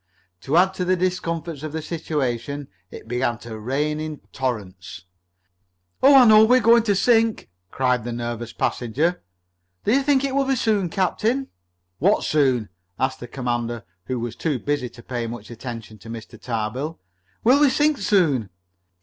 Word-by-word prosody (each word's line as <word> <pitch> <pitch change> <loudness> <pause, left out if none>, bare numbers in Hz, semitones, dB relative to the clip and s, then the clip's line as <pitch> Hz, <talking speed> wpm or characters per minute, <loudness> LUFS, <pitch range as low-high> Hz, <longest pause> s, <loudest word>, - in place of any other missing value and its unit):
To 140 - 0
add 190 +2 +4
to 185 - -3
the 185 +1 +2
discomforts 170 -4 -2
of 155 -1 -6
the 160 - -3
situation, 145 -4 -3 0.2
it - - -11
began 120 0 -1
to 110 -2 -8
rain 145 +7 -1
in 155 -1 -5
torrents. 95 -8 -5 1.0
"Oh, 275 +2 +7
I 260 -2 +9
know 215 -1 +8
we're 250 +3 +5
going 235 0 +6
to 205 -3 +2
sink!" 225 - +2 0.2
cried 125 0 0
the 120 - -4
nervous 120 0 -4
passenger. 150 +10 -1 0.6
"Do - - +1
you 275 - +4
think 275 -1 +2
it 275 -1 -1
will 275 0 +2
be 270 0 +1
soon, 210 -6 +1
captain?" 225 +9 0 0.5
"What 200 +6 +3
soon?" 130 -8 +1 0.3
asked 130 0 0
the 120 - -8
commander, 120 -2 -3 0.2
who 130 -1 -3
was 115 0 -4
too 150 -5 -1
busy 140 -1 -2
to 120 0 -15
pay 120 -2 -3
much 115 -1 -8
attention 115 -2 -8
to 115 - -12
Mr. 115 -1 -9
Tarbill. 125 +7 -3 0.4
"Will 255 +5 +5
we 295 -1 +6
sink 295 +2 +2
soon?" 165 - +2
145 Hz, 165 wpm, -23 LUFS, 120-195 Hz, 1.0 s, I